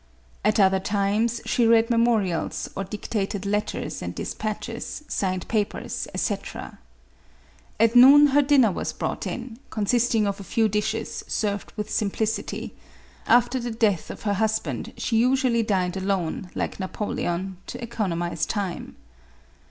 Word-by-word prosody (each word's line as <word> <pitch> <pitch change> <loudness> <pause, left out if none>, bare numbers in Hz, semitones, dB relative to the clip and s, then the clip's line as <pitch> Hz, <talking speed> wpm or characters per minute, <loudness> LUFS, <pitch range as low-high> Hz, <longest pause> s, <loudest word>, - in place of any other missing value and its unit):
At - - +2
other 190 -1 +5
times, 210 +4 0
she 235 -2 +2
read 230 +1 +4
memorials, 230 -7 +1
or 195 - -2
dictated 200 0 -3
letters 210 +1 -2
and - - -5
de - - -4
spatches, 225 +6 -5
signed 185 -2 -2
papers, 210 -3 -2
&c. - - 0 1.4
At 230 +2 +4
noon, 275 +4 +9
her 285 +2 +5
dinner 270 -6 +4
was - - -3
brought - - -3
in, 240 -2 -6
consisting 220 +1 +1
of 200 0 -2
a - - -7
few 220 +4 +1
dishes, 215 +2 -2
served 205 -2 -2
with 210 0 -4
sim 210 -2 +1
plicity; 220 +2 -2 0.6
after 245 +2 +4
the 240 0 -3
death 220 -6 +1
of - - -8
her 205 -2 +1
husband 210 - -1
she 225 - 0
usually 250 0 +3
dined 185 -4 0
alone, 190 -2 -2
like - - -3
Napoleon, 185 -1 -3
to 245 - -6
economize 175 -8 -2
time. 200 -5 -3
215 Hz, 140 wpm, -25 LUFS, 195-230 Hz, 1.4 s, noon